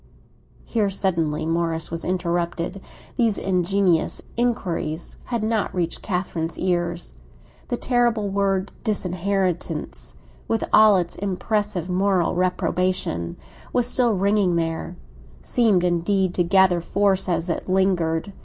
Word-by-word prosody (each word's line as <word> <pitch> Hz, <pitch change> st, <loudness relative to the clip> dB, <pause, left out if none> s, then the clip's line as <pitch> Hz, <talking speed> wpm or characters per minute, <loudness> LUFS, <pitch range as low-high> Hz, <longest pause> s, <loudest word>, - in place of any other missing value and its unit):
Here, 215 Hz, -4 st, 0 dB
suddenly, 165 Hz, -6 st, 0 dB
Morris 165 Hz, -1 st, 0 dB
was 165 Hz, 0 st, -4 dB
interrupted; 175 Hz, +1 st, -2 dB, 0.4 s
these 230 Hz, -4 st, +3 dB
ingenious 185 Hz, -2 st, +1 dB, 0.2 s
inquiries 180 Hz, -9 st, -2 dB
had 235 Hz, -3 st, -2 dB
not 220 Hz, -3 st, 0 dB
reached 170 Hz, -2 st, -2 dB
Catherine's 180 Hz, -4 st, -3 dB
ears. 175 Hz, -1 st, -1 dB, 0.5 s
The 245 Hz, -, -2 dB
terrible 240 Hz, -5 st, +1 dB
word 195 Hz, -1 st, 0 dB
"disinheritance," 190 Hz, -3 st, -2 dB, 0.3 s
with 225 Hz, -, 0 dB
all 215 Hz, -1 st, +7 dB
its 175 Hz, -1 st, -2 dB
impressive 200 Hz, -1 st, -1 dB
moral 185 Hz, -1 st, +1 dB
reprobation, 180 Hz, -, -1 dB, 0.4 s
was 245 Hz, -1 st, +2 dB
still 245 Hz, -2 st, +2 dB
ringing 195 Hz, -2 st, +2 dB
there; 165 Hz, +1 st, -2 dB, 0.5 s
seemed 215 Hz, -7 st, +3 dB
indeed 180 Hz, +2 st, +1 dB
to 175 Hz, -, +2 dB
gather 180 Hz, 0 st, +4 dB
force 195 Hz, +1 st, +1 dB
as 170 Hz, 0 st, 0 dB
it 175 Hz, -, -3 dB
lingered. 185 Hz, -2 st, +1 dB
185 Hz, 115 wpm, -23 LUFS, 170-200 Hz, 0.5 s, all